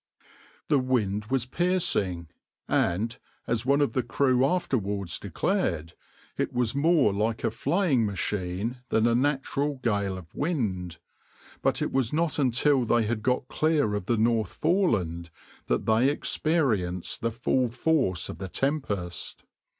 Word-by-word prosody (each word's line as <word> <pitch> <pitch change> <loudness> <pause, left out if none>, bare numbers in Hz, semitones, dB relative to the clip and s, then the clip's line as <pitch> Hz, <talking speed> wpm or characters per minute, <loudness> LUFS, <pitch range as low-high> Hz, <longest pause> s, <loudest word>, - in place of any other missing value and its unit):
\par - - -31 0.4
The 145 -3 +4
wind 105 -6 0
was 130 -1 0
piercing, 130 - 0 0.4
and, 105 +7 +1 0.3
as 115 +1 -1
one 140 +1 +4
of 145 - +1
the 130 - +1
crew 130 +1 +2
afterwards 105 - -1
declared, 85 +1 -1 0.5
it - - 0
was 120 -2 0
more 150 - +3
like 110 +3 -1
a 115 - +1
flaying 140 - +1
machine 100 +3 -2
than 110 0 +2
a 120 - +3
natural 140 +2 0
gale 100 -4 0
of 80 -4 -12
wind; 100 - -2 0.6
but - - +1
it - - -2
was 130 -4 +1
not 160 0 0
until 135 +1 +3
they 120 0 +2
had 110 0 -2
got 125 +2 0
clear 155 -9 +1
of 105 -3 -3
the 120 - +2
North 110 -2 +1
Foreland 100 - 0 0.4
that 60 - 0
they 115 +4 +4
experienced 120 - 0
the 115 - +1
full 125 +2 +1
force 120 - 0
of - - -8
the 95 - -5
tempest. 105 - -3
120 Hz, 145 wpm, -27 LUFS, 100-140 Hz, 0.6 s, The